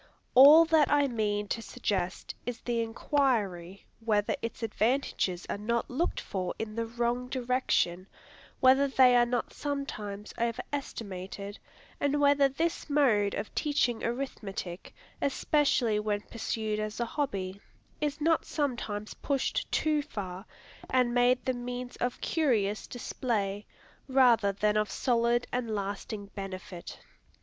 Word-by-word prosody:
All 295 +6 +9
that 320 -3 +4
I 290 -1 +4
mean 210 -4 -1
to 230 - -2
suggest 195 -6 -3
is 245 -2 -5
the 235 -1 -1
inquiry, 225 - -1
whether 215 -1 +1
its 230 0 -5
advantages 220 -5 0
are - - -3
not 235 +3 -1
looked 310 +8 0
for 185 -2 -4
in 220 -1 -4
the 230 +1 -2
wrong 240 +2 -1
direction, 245 -8 0 0.5
whether 265 +2 +6
they 260 -2 +5
are 240 0 +5
not 245 -1 -2
sometimes 215 -8 -5
over 235 0 -1
estimated, 200 -6 -5 0.4
and 285 +1 +1
whether 285 -1 +5
this 320 +4 -2
mode 235 -9 +3
of - - -5
teaching 280 -6 0
arithmetic, 210 -7 -4 0.3
especially 275 -6 +2
when 210 -1 -1
pursued 220 -1 -3
as 215 +1 -4
a 235 - +1
hobby, 200 -8 -3 0.4
is 295 -1 -2
not 325 +1 +2
sometimes 235 -8 -3
pushed 275 -2 -1
too 305 -1 +2
far, 195 -8 -7 0.4
and 250 -2 +2
made 245 +1 +3
the 260 - +1
means 245 0 -5
of 245 0 -2
curious 220 -11 +1
display, 210 -4 -2 0.4
rather 245 -6 +4
than 210 +2 +1
of 210 -1 +1
solid 240 -1 +1
and 245 -2 -2
lasting 200 +1 -4
benefit. 190 -2 -7
235 Hz, 130 wpm, -29 LUFS, 205-265 Hz, 0.5 s, All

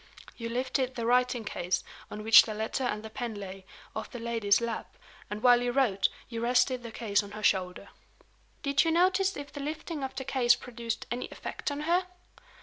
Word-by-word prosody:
"You 230 -1 -5
lifted 255 +1 -1
the 235 - -3
writing 250 -1 +2
case, 180 -3 -1 0.3
on 210 - -7
which 220 -1 +10
the 215 - -5
letter 220 +5 -2
and 210 -3 -2
the 220 - -7
pen 240 -3 -4
lay, 195 -1 -8 0.3
off 220 - -4
the - - -7
lady's 230 -4 +2
lap; 235 -1 -4 0.3
and, 210 +1 -5
while 245 -1 +6
you 245 0 0
wrote, 240 -7 +2 0.2
you 230 -1 -5
rested 250 +1 +2
the 235 -1 -8
case 210 -3 +1
on 205 0 -10
her 215 0 -7
shoulder." 185 -3 +1 0.7
"Did 280 -1 +3
you 330 - +1
notice 370 +3 +3
if 285 0 -8
the 285 - -6
lifting 305 +1 -4
of 265 - -4
the 265 - -4
case 240 -3 +4
produced 235 -2 -5
any 245 +1 -2
effect - - -5
on 285 0 -4
her?" 350 +4 +1
240 Hz, 200 wpm, -29 LUFS, 220-265 Hz, 0.7 s, which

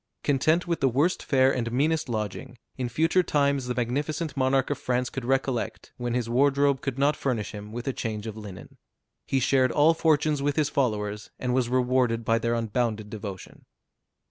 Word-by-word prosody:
Content 155 +5 +2
with 170 -2 -1
the 135 - +3
worst 145 +9 +1
fare 135 -1 +3
and 115 -2 -2
meanest 150 +3 +1
lodging, 110 +2 -4 0.2
in 125 -2 -3
future 165 +8 +2
times 140 -5 +1
the 125 - -2
magnificent 145 +6 -2
monarch 135 0 +1
of 145 - -2
France 125 0 -1
could 135 - -5
recollect 135 -2 -1
when 120 -1 -2
his 120 -2 -1
wardrobe 140 +2 +2
could 135 -2 -3
not 140 +2 +3
furnish 120 -6 -2
him 105 0 -8
with 120 +4 -6
a 135 - 0
change 110 -3 -4
of 110 -2 -5
linen. 100 -6 -10 0.5
He 135 - +1
shared 130 -1 +3
all 155 +3 +5
fortunes 155 -2 +2
with 145 0 0
his 150 -2 +1
followers, 105 -6 -1
and 125 -1 -2
was 125 -2 +1
rewarded 125 -2 +1
by 115 0 +2
their 115 +1 0
unbounded 110 -2 -2
devotion. 100 -3 -8
130 Hz, 185 wpm, -26 LUFS, 115-140 Hz, 0.5 s, all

